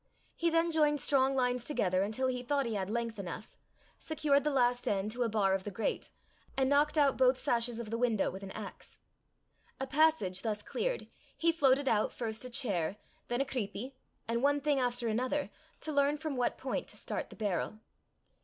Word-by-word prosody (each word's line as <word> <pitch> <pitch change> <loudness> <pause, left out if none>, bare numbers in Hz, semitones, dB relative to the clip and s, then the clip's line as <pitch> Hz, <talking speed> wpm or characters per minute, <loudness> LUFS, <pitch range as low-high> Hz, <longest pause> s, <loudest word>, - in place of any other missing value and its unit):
He 335 - +1
then 330 +1 +2
joined 300 -2 +3
strong 270 -2 +3
lines 250 -2 +1
together 185 -10 +1
until 215 +6 -1
he 255 -1 0
thought 275 +2 0
he 230 - -2
had 195 -2 -2
length 230 -1 -2
enough, 195 +3 -6 0.4
secured 300 -3 +2
the 300 - +2
last 245 -3 +2
end 200 +1 0
to 245 +2 -4
a 235 - +2
bar 205 -3 +2
of 190 -1 0
the 205 - -4
grate, 210 +3 -2 0.5
and 265 -1 +3
knocked 295 +2 +3
out 285 -3 +4
both 255 0 +5
sashes 235 -2 0
of 230 -2 -6
the 230 - -1
window 230 -5 +2
with 190 - -8
an 195 - -7
axe. 210 -2 -9 0.8
A 265 - -1
passage 270 -10 +2
thus 210 -2 -2
cleared, - - -2 0.3
he 335 0 +3
floated 280 -3 +3
out 215 -3 +2
first 225 -1 -4
a 255 - -5
chair, 200 - 0 0.3
then 240 +2 0
a - - +1
creepie, 255 0 -4 0.3
and 235 +1 0
one 285 +1 +3
thing 285 -1 +1
after 245 -1 0
another, 255 +6 0 0.3
to 310 - -3
learn 285 0 +3
from 310 -2 -3
what 245 -1 0
point - - -3
to - - -9
start - - -4
the - - -11
barrel. 210 0 -2
250 Hz, 200 wpm, -32 LUFS, 215-285 Hz, 0.8 s, both